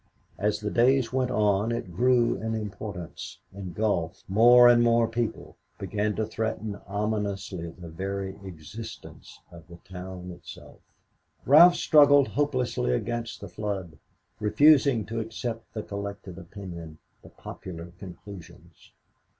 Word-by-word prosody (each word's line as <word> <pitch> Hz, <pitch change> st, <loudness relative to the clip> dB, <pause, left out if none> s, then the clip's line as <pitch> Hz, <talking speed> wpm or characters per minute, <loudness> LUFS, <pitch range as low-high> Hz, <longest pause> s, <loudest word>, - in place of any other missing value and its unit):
As 105 Hz, +1 st, 0 dB
the 105 Hz, -1 st, -3 dB
days 125 Hz, 0 st, +3 dB
went 130 Hz, -1 st, +1 dB
on 105 Hz, -2 st, +1 dB
it 95 Hz, -7 st, -4 dB
grew 120 Hz, +2 st, +3 dB
in 110 Hz, 0 st, -3 dB
importance, 100 Hz, -4 st, -7 dB, 0.2 s
engulfed 95 Hz, -3 st, -2 dB
more 120 Hz, +5 st, +7 dB
and 120 Hz, -1 st, +6 dB
more 115 Hz, -1 st, +3 dB
people, 115 Hz, 0 st, -4 dB, 0.2 s
began 105 Hz, 0 st, -2 dB
to 110 Hz, -, -1 dB
threaten 110 Hz, -1 st, -3 dB
ominously 100 Hz, -4 st, -3 dB
the 85 Hz, +1 st, -11 dB
very 95 Hz, +3 st, -4 dB
existence 95 Hz, +5 st, -10 dB
of 85 Hz, -2 st, -14 dB
the 85 Hz, 0 st, -12 dB
town 90 Hz, -1 st, -8 dB
itself. 85 Hz, -, -12 dB, 0.7 s
Ralph 170 Hz, +6 st, +8 dB
struggled 145 Hz, -3 st, +5 dB
hopelessly 130 Hz, -, 0 dB
against 115 Hz, -, -3 dB
the 100 Hz, -, -7 dB
flood, 95 Hz, -4 st, -5 dB, 0.4 s
refusing 135 Hz, +1 st, +4 dB
to 115 Hz, +1 st, -4 dB
accept 115 Hz, 0 st, -5 dB
the 110 Hz, -, -5 dB
collected 100 Hz, -2 st, -7 dB
opinion, 85 Hz, -4 st, -9 dB, 0.2 s
the -, -, -15 dB
popular 85 Hz, -2 st, -9 dB
conclusions. 95 Hz, -1 st, -12 dB
105 Hz, 125 wpm, -27 LUFS, 95-115 Hz, 0.7 s, Ralph